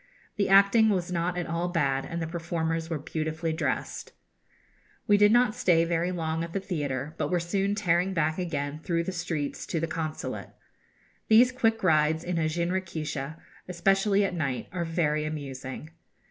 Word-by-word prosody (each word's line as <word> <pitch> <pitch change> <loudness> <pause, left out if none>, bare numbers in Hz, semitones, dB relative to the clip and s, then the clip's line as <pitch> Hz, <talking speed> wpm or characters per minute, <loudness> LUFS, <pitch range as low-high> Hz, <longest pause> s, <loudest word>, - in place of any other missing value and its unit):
The 200 -2 0
acting 200 +3 +6
was 180 -3 0
not 175 +1 -1
at 175 - -1
all 170 +1 -2
bad, 135 -6 0
and 170 - -4
the 165 - -2
performers 165 -1 -2
were 165 - -1
beautifully 160 +2 -3
dressed. 160 - -3 0.9
We 205 - +5
did 205 0 +5
not 240 -1 +4
stay 165 -5 +3
very 170 +1 0
long 165 -2 -2
at 170 0 -7
the 195 - 0
theatre, 150 -6 -3
but - - 0
were 180 - +1
soon 195 +4 0
tearing 180 -2 +1
back 160 0 +1
again 150 -4 -3
through 170 +1 -1
the 190 - -3
streets 165 -5 -3
to 175 -5 -1
the 165 - 0
Consulate. 160 -1 -4 0.8
These 235 +3 +6
quick 225 -4 +1
rides 155 -2 +3
in 175 -1 -1
a 155 -1 +1
jinrikisha, 160 -4 -3 0.3
especially 195 +3 +2
at 190 - -2
night, 140 -7 -2
are 175 -1 -2
very 155 -2 0
amusing. 140 -1 -6
170 Hz, 170 wpm, -27 LUFS, 155-185 Hz, 0.9 s, acting